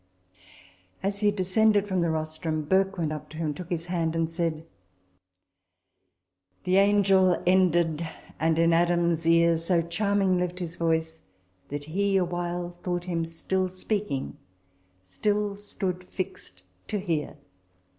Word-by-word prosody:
As 200 Hz, +1 st, -1 dB
he 210 Hz, 0 st, +3 dB
descended 205 Hz, +1 st, +2 dB
from 185 Hz, -3 st, 0 dB
the 170 Hz, -, +1 dB
rostrum, 155 Hz, 0 st, -2 dB
Burke 190 Hz, +5 st, +2 dB
went 160 Hz, -3 st, -1 dB
up 155 Hz, -1 st, -6 dB
to 155 Hz, -, -10 dB
him, 155 Hz, -2 st, -1 dB
took 175 Hz, +3 st, -9 dB
his 170 Hz, -1 st, -2 dB
hand, 165 Hz, -2 st, -1 dB
and 165 Hz, 0 st, +1 dB
said, 165 Hz, -1 st, -2 dB, 2.0 s
"The 185 Hz, +1 st, +2 dB
Angel 195 Hz, -2 st, +4 dB
ended, 170 Hz, -3 st, +2 dB, 0.3 s
and 160 Hz, 0 st, +2 dB
in 165 Hz, 0 st, +4 dB
Adam's 170 Hz, -1 st, +2 dB
ear 170 Hz, 0 st, +5 dB
So 165 Hz, +1 st, +2 dB
charming 195 Hz, +1 st, +1 dB
left 180 Hz, 0 st, -2 dB
his 175 Hz, -2 st, -4 dB
voice, 160 Hz, -1 st, -1 dB, 0.5 s
that 145 Hz, 0 st, -5 dB
he 195 Hz, +5 st, +1 dB
a 185 Hz, -, +2 dB
while 175 Hz, 0 st, -3 dB
Thought 175 Hz, -1 st, -2 dB
him 170 Hz, -2 st, -2 dB
still 185 Hz, +3 st, -2 dB
speaking, 185 Hz, -6 st, -3 dB, 0.7 s
still 205 Hz, -, -1 dB
stood 190 Hz, -3 st, -4 dB
fix'd 95 Hz, -, -7 dB, 0.2 s
to 210 Hz, -, -2 dB
hear." 165 Hz, -7 st, -2 dB
175 Hz, 135 wpm, -27 LUFS, 165-190 Hz, 2.0 s, ear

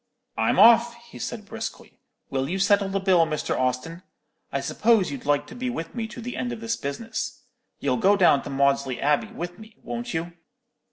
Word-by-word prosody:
"'I'm -, -, +1 dB
off,' 235 Hz, +1 st, +7 dB
he 235 Hz, 0 st, -14 dB
said, 220 Hz, -3 st, -5 dB
briskly. 225 Hz, +2 st, -7 dB, 0.3 s
'Will 135 Hz, 0 st, -1 dB
you 185 Hz, -, -1 dB
settle 200 Hz, 0 st, +3 dB
the 195 Hz, +1 st, 0 dB
bill, 185 Hz, -4 st, +4 dB
Mr. 155 Hz, -, -2 dB
Austin? 130 Hz, +7 st, -2 dB, 0.5 s
I -, -, -1 dB
suppose 220 Hz, -7 st, +2 dB
you'd 140 Hz, 0 st, -7 dB
like 145 Hz, 0 st, +2 dB
to -, -, -11 dB
be 250 Hz, +1 st, -3 dB
with 165 Hz, -9 st, -5 dB
me 230 Hz, -2 st, -3 dB
to 240 Hz, -, -9 dB
the 245 Hz, +2 st, -5 dB
end 245 Hz, -, -2 dB
of 235 Hz, -, -5 dB
this 230 Hz, +1 st, -2 dB
business. 220 Hz, +11 st, -5 dB, 0.4 s
You'll 130 Hz, -3 st, 0 dB
go 200 Hz, +7 st, +4 dB
down 175 Hz, -7 st, +5 dB
to -, -, -8 dB
Maudesley 135 Hz, -2 st, +1 dB
Abbey 145 Hz, +8 st, +2 dB
with 175 Hz, -5 st, -7 dB
me, 220 Hz, 0 st, -14 dB
won't 240 Hz, 0 st, -5 dB
you?' 170 Hz, +2 st, -3 dB
195 Hz, 200 wpm, -25 LUFS, 145-230 Hz, 0.5 s, off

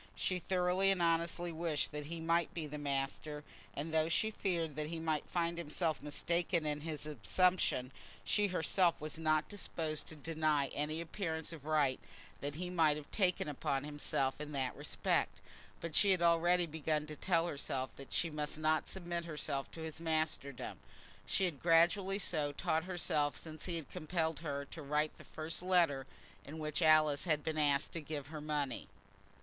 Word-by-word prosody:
She 185 Hz, -1 st, 0 dB
thoroughly 180 Hz, +2 st, +2 dB
and 195 Hz, -2 st, +2 dB
honestly 170 Hz, +1 st, +1 dB
wished 160 Hz, -2 st, -1 dB
that 150 Hz, -1 st, -4 dB
he 165 Hz, +1 st, -5 dB
might 165 Hz, 0 st, +2 dB
be 165 Hz, -3 st, -2 dB
the 150 Hz, 0 st, -6 dB
master; 145 Hz, +1 st, -2 dB, 0.3 s
and 155 Hz, +3 st, -4 dB
though 160 Hz, 0 st, +3 dB
she 215 Hz, +7 st, +2 dB
feared 170 Hz, -7 st, -1 dB
that 150 Hz, 0 st, -2 dB
he 165 Hz, +1 st, -4 dB
might 160 Hz, -2 st, -1 dB
find 170 Hz, -1 st, 0 dB
himself 160 Hz, -1 st, -1 dB
mistaken 170 Hz, +3 st, +1 dB
in 150 Hz, -1 st, -1 dB
his 155 Hz, -1 st, -4 dB
assumption, 150 Hz, -, +2 dB, 0.3 s
she 205 Hz, 0 st, +3 dB
herself 180 Hz, -1 st, +2 dB
was 155 Hz, +1 st, -5 dB
not 155 Hz, -1 st, +2 dB
disposed 160 Hz, -6 st, -3 dB
to 160 Hz, -, -7 dB
deny 155 Hz, -2 st, +1 dB
any 155 Hz, +3 st, -2 dB
appearance 165 Hz, -2 st, -3 dB
of 150 Hz, -4 st, -10 dB
right 150 Hz, -4 st, +2 dB, 0.4 s
that 145 Hz, +1 st, -4 dB
he 180 Hz, +3 st, -3 dB
might 150 Hz, -4 st, +2 dB
take 185 Hz, -4 st, +2 dB
upon 140 Hz, -1 st, -1 dB
himself 145 Hz, -2 st, -1 dB
in 150 Hz, 0 st, -6 dB
that 130 Hz, -2 st, -1 dB
respect. -, -, 0 dB, 0.4 s
But 170 Hz, -2 st, -4 dB
she 205 Hz, -, +6 dB
had 185 Hz, -2 st, +4 dB
already 170 Hz, +1 st, +4 dB
begun 155 Hz, -1 st, -1 dB
to 155 Hz, 0 st, -7 dB
tell 170 Hz, +1 st, +2 dB
herself 135 Hz, -4 st, -3 dB
that 135 Hz, -, -10 dB
she 165 Hz, -, +1 dB
must 150 Hz, 0 st, -3 dB
not 155 Hz, 0 st, +1 dB
submit 175 Hz, -2 st, -3 dB
herself 150 Hz, -4 st, -2 dB
to 165 Hz, -, -7 dB
his 160 Hz, 0 st, -6 dB
masterdom. 155 Hz, -5 st, -2 dB, 0.5 s
She 190 Hz, -, +2 dB
had 155 Hz, -7 st, -3 dB
gradually 175 Hz, +4 st, +4 dB
so 155 Hz, -7 st, 0 dB
taught 160 Hz, +3 st, 0 dB
herself 155 Hz, -7 st, 0 dB
since 155 Hz, +6 st, -8 dB
he 175 Hz, -, -2 dB
had 160 Hz, -4 st, -5 dB
compelled 160 Hz, -2 st, -1 dB
her 140 Hz, -3 st, -3 dB
to 165 Hz, -, -6 dB
write 150 Hz, +1 st, 0 dB
the -, -, -10 dB
first 160 Hz, +1 st, -4 dB
letter 170 Hz, -7 st, +3 dB, 0.4 s
in 150 Hz, +3 st, -8 dB
which 155 Hz, +1 st, -2 dB
Alice 155 Hz, -2 st, +5 dB
had 155 Hz, -4 st, +1 dB
been 155 Hz, -1 st, -1 dB
asked 145 Hz, -1 st, +2 dB
to 165 Hz, -, -3 dB
give 145 Hz, -2 st, -5 dB
her 155 Hz, -1 st, -6 dB
money. 145 Hz, -4 st, -2 dB
155 Hz, 175 wpm, -35 LUFS, 150-170 Hz, 0.5 s, she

